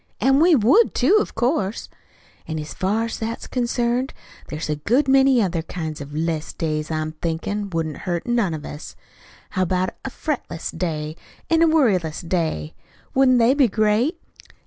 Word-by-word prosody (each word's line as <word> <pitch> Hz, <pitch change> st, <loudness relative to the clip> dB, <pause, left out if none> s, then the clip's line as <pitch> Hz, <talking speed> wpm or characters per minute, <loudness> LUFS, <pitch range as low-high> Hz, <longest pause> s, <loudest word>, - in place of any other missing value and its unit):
"An' 270 Hz, +1 st, +4 dB
we 335 Hz, +1 st, +6 dB
would, 275 Hz, -, +4 dB
too, 425 Hz, -, +4 dB
of -, -, -3 dB
course. 230 Hz, -4 st, 0 dB, 0.6 s
"An' 160 Hz, -, -3 dB
as 150 Hz, 0 st, -6 dB
far 205 Hz, +4 st, 0 dB
as 230 Hz, -, -5 dB
that's 225 Hz, +1 st, -4 dB
concerned, 245 Hz, +1 st, -1 dB, 0.3 s
there's 155 Hz, +1 st, -5 dB
a 150 Hz, -1 st, -1 dB
good 245 Hz, -, +1 dB
many 270 Hz, -3 st, +5 dB
other 175 Hz, -3 st, -1 dB
kinds 160 Hz, -2 st, -5 dB
of 145 Hz, 0 st, -8 dB
'less 160 Hz, -1 st, -2 dB
days 155 Hz, -2 st, -2 dB
that 155 Hz, -1 st, -2 dB
I'm 155 Hz, 0 st, -3 dB
thinkin' 170 Hz, +6 st, -3 dB
wouldn't 165 Hz, -4 st, -2 dB
hurt 175 Hz, -2 st, -3 dB
none 235 Hz, -9 st, +1 dB
of 150 Hz, -, -8 dB
us. 150 Hz, -, -8 dB, 0.6 s
How 185 Hz, -, -1 dB
about 185 Hz, +1 st, +1 dB
a 265 Hz, -, -3 dB
fretless 270 Hz, -, -4 dB
day 155 Hz, -3 st, -3 dB, 0.3 s
an' 325 Hz, 0 st, +4 dB
a 335 Hz, -, +6 dB
worryless 190 Hz, -, +1 dB
day? 160 Hz, -, -1 dB, 0.4 s
Wouldn't 260 Hz, -1 st, +5 dB
they 235 Hz, +2 st, +5 dB
be 280 Hz, -3 st, +4 dB
great? 215 Hz, -, +1 dB
200 Hz, 170 wpm, -22 LUFS, 160-255 Hz, 0.6 s, we